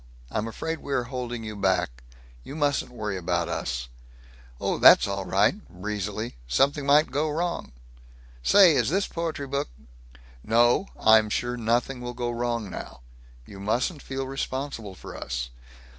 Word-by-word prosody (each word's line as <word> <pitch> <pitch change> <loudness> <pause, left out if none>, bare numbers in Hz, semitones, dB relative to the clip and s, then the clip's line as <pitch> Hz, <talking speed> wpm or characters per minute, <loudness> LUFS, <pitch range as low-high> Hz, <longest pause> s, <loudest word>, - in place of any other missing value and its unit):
I'm 110 +1 -1
afraid 160 +8 -4
we 140 - -5
are 125 - +1
holding 120 -2 -5
you 110 -1 -6
back. 95 -11 0 0.4
You 140 - -8
mustn't 145 -4 0
worry 105 -5 -4
about 85 -1 0
us." 60 -7 -3 0.7
"Oh, - - -1
that's - - +8
all 100 -1 -3
right," 100 +3 +3 0.2
breezily. 105 - -4
"Something 140 - +2
might 150 +2 +5
go 150 +3 0
wrong. 170 - -2 0.7
Say, 185 - +7
is - - +2
this 195 +5 +1
poetry 165 -4 -3
book 140 - -2 0.4
" - - -21 0.2
"No, 120 - +3
I'm 110 -1 +6
sure 120 +3 -1
nothing 120 +2 0
will 120 0 -5
go 120 -1 -2
wrong 120 -2 -2
now. 95 - -8 0.4
You 100 - -11
mustn't 125 - -1
feel 135 0 -4
responsible 130 -6 -4
for - - -10
us. - - -4
120 Hz, 155 wpm, -26 LUFS, 100-140 Hz, 0.7 s, that's